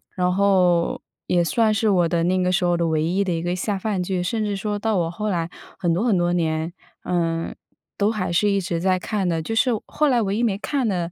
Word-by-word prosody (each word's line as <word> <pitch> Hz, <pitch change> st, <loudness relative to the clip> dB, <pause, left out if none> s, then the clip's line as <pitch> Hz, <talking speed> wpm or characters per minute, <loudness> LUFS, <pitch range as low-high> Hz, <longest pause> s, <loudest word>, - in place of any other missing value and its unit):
然 180 Hz, -1 st, +1 dB
后 185 Hz, -3 st, +2 dB, 0.3 s
也 175 Hz, -1 st, +2 dB
算 220 Hz, +4 st, +2 dB
是 215 Hz, 0 st, +1 dB
我 175 Hz, -4 st, +3 dB
的 165 Hz, 0 st, 0 dB
那 185 Hz, +1 st, +1 dB
个 180 Hz, -, +1 dB
时 180 Hz, 0 st, +1 dB
候 175 Hz, -1 st, +2 dB
的 170 Hz, -1 st, +1 dB
唯 155 Hz, -1 st, +1 dB
一 180 Hz, +4 st, 0 dB
的 180 Hz, -, 0 dB
一 165 Hz, -, -2 dB
个 175 Hz, 0 st, -1 dB
下 195 Hz, +2 st, -2 dB
饭 195 Hz, -2 st, -2 dB
剧。 180 Hz, 0 st, -1 dB
甚 215 Hz, +4 st, -1 dB
至 205 Hz, -1 st, -1 dB
说 205 Hz, +1 st, -3 dB
到 220 Hz, 0 st, 0 dB
我 170 Hz, -2 st, 0 dB
后 210 Hz, +5 st, -4 dB
来 170 Hz, -3 st, -1 dB, 0.3 s
很 170 Hz, -2 st, 0 dB
多 200 Hz, +8 st, 0 dB
很 210 Hz, -6 st, +3 dB
多 175 Hz, 0 st, +1 dB
年， 160 Hz, -1 st, -1 dB, 0.3 s
嗯， 165 Hz, -2 st, -1 dB, 0.4 s
都 205 Hz, +1 st, +2 dB
还 185 Hz, -5 st, -2 dB
是 205 Hz, +5 st, +2 dB
一 200 Hz, -1 st, +1 dB
直 170 Hz, -2 st, -2 dB
在 185 Hz, +1 st, +2 dB
看 195 Hz, 0 st, -2 dB
的。 165 Hz, -2 st, 0 dB
就 225 Hz, -, -4 dB
是 245 Hz, +3 st, +3 dB
后 300 Hz, -, 0 dB
来 245 Hz, -4 st, +3 dB
唯 200 Hz, -1 st, -1 dB
一 240 Hz, -, 0 dB
没 200 Hz, -4 st, +1 dB
看 260 Hz, +2 st, -1 dB
的 175 Hz, -4 st, -1 dB
185 Hz, 270 characters per minute, -22 LUFS, 170-205 Hz, 0.4 s, 我